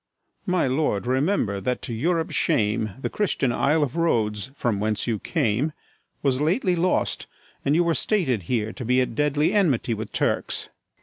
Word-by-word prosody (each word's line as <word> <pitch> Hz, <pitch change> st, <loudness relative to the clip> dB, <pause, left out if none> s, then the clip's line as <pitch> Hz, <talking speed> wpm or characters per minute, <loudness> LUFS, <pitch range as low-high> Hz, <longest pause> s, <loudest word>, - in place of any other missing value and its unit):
My 180 Hz, -3 st, +2 dB
lord, 130 Hz, -5 st, 0 dB
remember 130 Hz, -, +1 dB
that, 125 Hz, +2 st, -2 dB
to 120 Hz, -, -4 dB
Europe's 165 Hz, +7 st, 0 dB
shame, 105 Hz, -1 st, +1 dB
The -, -, -2 dB
Christian 175 Hz, -11 st, 0 dB
isle 150 Hz, +5 st, +2 dB
of 135 Hz, -1 st, -3 dB
Rhodes, 115 Hz, -10 st, 0 dB
from 115 Hz, -7 st, -1 dB
whence 105 Hz, 0 st, -1 dB
you 115 Hz, -3 st, -1 dB
came, 120 Hz, +12 st, 0 dB, 0.5 s
Was 135 Hz, -1 st, +1 dB
lately 180 Hz, -, +2 dB
lost, 180 Hz, +2 st, 0 dB, 0.4 s
and 140 Hz, -, +2 dB
you 175 Hz, -, +4 dB
were 170 Hz, -1 st, +2 dB
stated 160 Hz, -, +1 dB
here 110 Hz, -3 st, 0 dB
To 130 Hz, -, -7 dB
be 125 Hz, +2 st, +2 dB
at 125 Hz, -, 0 dB
deadly 150 Hz, +3 st, +1 dB
enmity 145 Hz, -, +2 dB
with 110 Hz, -1 st, -5 dB
Turks. -, -, -1 dB
130 Hz, 170 wpm, -24 LUFS, 110-160 Hz, 0.5 s, you